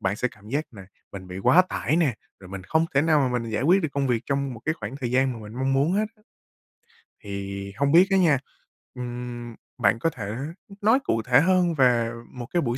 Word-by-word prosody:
bạn 95 +2 -1
sẽ 125 - 0
cảm 105 0 -17
giác 145 +5 -1
là 100 -4 -11 0.3
mình 95 -2 -8
bị 90 +1 -6
quá 175 - +5
tải 155 - -1
nè, 155 -8 +2 0.3
rồi 95 - -12
mình 95 -1 -7
không 160 - +2
thể 140 - +4
nào 155 -2 +3
mà 125 0 0
mình 115 -1 -5
giải 110 +4 -1
quyết 185 +6 +4
được 160 - 0
công 140 -1 0
việc 120 -2 +1
trong 140 -2 -1
một 115 - -11
cái 155 - 0
khoảng 110 -1 -7
thời 125 -4 -3
gian 130 +1 +2
mà - - -8
mình 105 +1 -10
mong 130 +2 0
muốn 140 +5 +2
hết 210 +3 +2
á. 215 - -28 1.0
Thì 100 0 -5
hông 140 +2 +2
biết 175 +4 +7
á 195 - +4
nha, 160 -8 +4 0.6
ừm, 120 -1 -6 0.2
bạn 115 -2 +2
có 165 - +1
thể 110 -9 -6 0.5
nói 220 +6 +4
cụ 115 - 0
thể 125 +3 +4
hơn 180 0 +3
về 120 -4 +3 0.2
một 125 -2 -7
cái 175 - +2
buổi 120 -3 -1
125 Hz, 240 wpm, -25 LUFS, 110-155 Hz, 1.0 s, biết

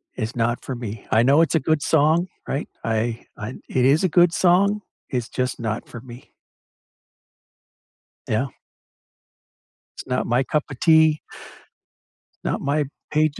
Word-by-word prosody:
it's 110 +3 -4
not 120 +1 0
for 130 - -4
me. 115 -3 -7
I 115 +1 +4
know 140 +5 +5
it's 165 - +2
a - - +4
good 155 +2 +1
song, 160 +4 +3 0.2
right? 140 - -3
I 115 +1 -1
I 105 +5 -6
it 125 -1 +1
is 145 +6 +4
a 185 - +3
good 175 +1 +5
song, 200 +3 +3 0.3
it's 125 -3 -2
just 125 -1 -2
not 110 0 -3
for 115 - -9
me. 120 +1 -13 2.0
Yeah. 110 +5 0 1.5
It's - - -8
not 125 0 -1
my 125 +3 +2
cup 150 +2 0
of 135 - -9
tea 160 -2 +5 1.3
not - - -1
my 145 +1 0 0.3
page 155 -1 +1
135 Hz, 150 wpm, -22 LUFS, 120-160 Hz, 2.0 s, know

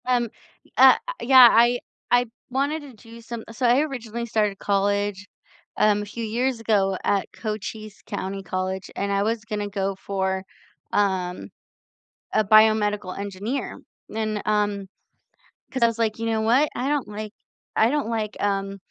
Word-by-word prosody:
Um, 245 -2 +1 0.4
y - - -25
uh, - - +9 0.3
yeah, 255 -1 +9
I 240 +2 +4 0.3
I 245 0 +5 0.2
wanted 280 +5 -1
to 285 -3 -12
do 230 +1 -14
some 230 0 -7
so 230 +3 -2
I 245 +3 +5
originally 235 -6 -4
started 215 -3 0
college, 200 0 0 0.5
um, 210 -1 +3
a - - -7
few 230 +3 -6
years 240 +3 -1
ago 200 -4 +1
at 200 -1 +1
Cochise 215 -1 -6
County 195 +1 -4
College 185 +1 -3
and 200 0 -2
I 200 0 +1
was 220 0 -1
gonna 210 -2 -3
go 195 -1 -2
for, 190 -1 -2 0.5
um, 185 -3 0 0.8
a 215 - +3
biomedical 210 -2 +4
engineer 200 +6 -4 0.3
and, 215 -1 -1
um 205 -2 0 0.9
'cause 260 -2 0
I - - +7
was 230 0 -3
like, 220 -1 0
"You 230 - -2
know 220 -1 0
what, 250 +7 +3
I 250 +2 -2
don't 290 -5 0
like 210 0 -7 0.4
I 220 - +4
don't 290 -6 -1
like, 220 -2 -2
um, 195 -1 -1
215 Hz, 160 wpm, -24 LUFS, 200-235 Hz, 0.9 s, uh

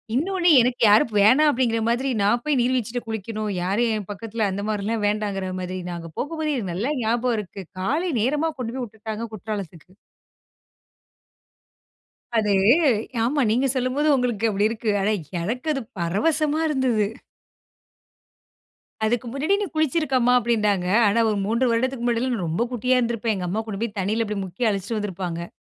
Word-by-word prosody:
இன்னொனு 355 +5 0
எனக்கு 245 +1 0
யாரும் 220 +4 +5
வேணா 235 +9 +6
அப்டிங்கிற 240 -4 +1
மாதிரி 255 +3 0
நான் 230 +4 +2
போய் 300 -3 +1
நீர் 245 +2 +2
வீழ்ச்சில 245 0 -2
குளிக்கணும், 215 0 -4
யாரும் 210 +6 +1
என் 210 -3 -5
பக்கத்தில 220 +1 -2
அந்தமாரிலாம் 210 +2 -2
வேண்டாங்கிறமாரி. 190 -3 -2
நாங்க 170 -1 -7
போகும்போதே 310 0 -2
எனக்கு 200 -9 -3
நல்லா 220 +11 -1
ஞாபகம் 235 +2 +1
இருக்கு. 195 -1 -7 0.2
காலை 310 - 0
நேரமா 295 +7 +1
கொண்டு 235 -1 -4
போய் 260 - -3
விட்டுட்டாங்க. 220 +1 -6
குற்றாலத்துக்கு. 195 -5 -6 2.5
அது, 210 -2 +2 0.7
ஆமா 280 +5 +1
நீங்க 255 +5 +2
சொல்லும்போது 260 +4 0
உங்களுக்கு 240 -4 0
அப்படி 205 0 +2
இருக்கு. 225 -1 -2
ஆனா 210 +2 +2 0.3
எனக்கு 245 - -3
அது 270 - -2 0.2
பரவசமா 300 - +1
இருந்தது. 255 -7 +1 2.0
அதுக்கு 240 +2 0
முன்னாடி 305 +8 +1
நீ 410 - -1
குளிச்சிருக்கம்மா 275 -5 +2
அப்படின்னாங்க. 210 -6 +1 0.2
ஆனா 205 +3 +2
ஒரு 210 - 0
3 235 +4 +1
வருடத்துக்கு 250 +1 -1
முன்னாடில்லாம் 245 +1 0
நான் 185 -6 -3
ரொம்ப 170 +9 0
குட்டியா 250 +2 +2
இருந்திருப்பேன். 230 -2 -1
எங்க 180 -2 -3
அம்மா 210 +5 -1
கொண்டு 210 0 -5
போய் 220 -2 -4
தண்ணியில 215 +4 0
இப்படி 210 -1 -3
முக்கி 190 +6 -2
அழச்சுட்டு 200 +2 -2
வந்திருப்பாங்க. 180 -4 -4
230 Hz, 145 wpm, -23 LUFS, 205-255 Hz, 2.5 s, வேணா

